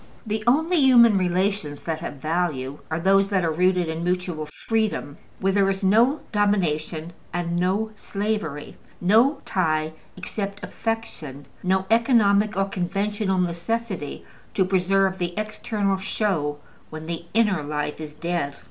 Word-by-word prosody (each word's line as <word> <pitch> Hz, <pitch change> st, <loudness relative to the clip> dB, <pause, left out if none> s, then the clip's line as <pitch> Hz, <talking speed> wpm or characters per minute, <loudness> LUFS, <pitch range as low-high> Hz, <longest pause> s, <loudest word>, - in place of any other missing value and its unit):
The 215 Hz, 0 st, -2 dB
only 320 Hz, +8 st, +3 dB
human 245 Hz, -6 st, +7 dB
relations 185 Hz, -4 st, 0 dB
that 160 Hz, -2 st, -2 dB
have 170 Hz, -, -5 dB
value 150 Hz, -3 st, -2 dB
are 160 Hz, +1 st, -1 dB
those 195 Hz, +2 st, +4 dB
that 190 Hz, -4 st, +1 dB
are 165 Hz, -, +1 dB
rooted 180 Hz, +1 st, +2 dB
in 160 Hz, +1 st, -3 dB
mutual 180 Hz, -3 st, -1 dB
freedom, 210 Hz, -4 st, -2 dB, 0.2 s
where 195 Hz, 0 st, +1 dB
there 195 Hz, -1 st, +3 dB
is 195 Hz, +1 st, -2 dB
no 230 Hz, +10 st, +4 dB
domination 170 Hz, -6 st, 0 dB, 0.2 s
and 170 Hz, 0 st, -2 dB
no 200 Hz, +5 st, 0 dB
slavery, 200 Hz, -10 st, -3 dB, 0.2 s
no 230 Hz, +10 st, +4 dB
tie 155 Hz, -3 st, 0 dB, 0.2 s
except 200 Hz, +2 st, -5 dB
affection, 165 Hz, -, -4 dB, 0.2 s
no 190 Hz, +1 st, +1 dB
economic 215 Hz, -3 st, +4 dB
or 195 Hz, -, +3 dB
conventional 195 Hz, +1 st, -1 dB
necessity 180 Hz, 0 st, -2 dB, 0.3 s
to 190 Hz, -, +3 dB
preserve 190 Hz, +1 st, +2 dB
the 175 Hz, +1 st, -3 dB
external 215 Hz, -2 st, -1 dB
show 185 Hz, -7 st, -1 dB, 0.3 s
when 155 Hz, 0 st, -7 dB
the 170 Hz, 0 st, -5 dB
inner 210 Hz, -7 st, +3 dB
life 150 Hz, +1 st, -3 dB
is 150 Hz, -1 st, -8 dB
dead. 170 Hz, -3 st, -2 dB
190 Hz, 140 wpm, -24 LUFS, 165-210 Hz, 0.3 s, human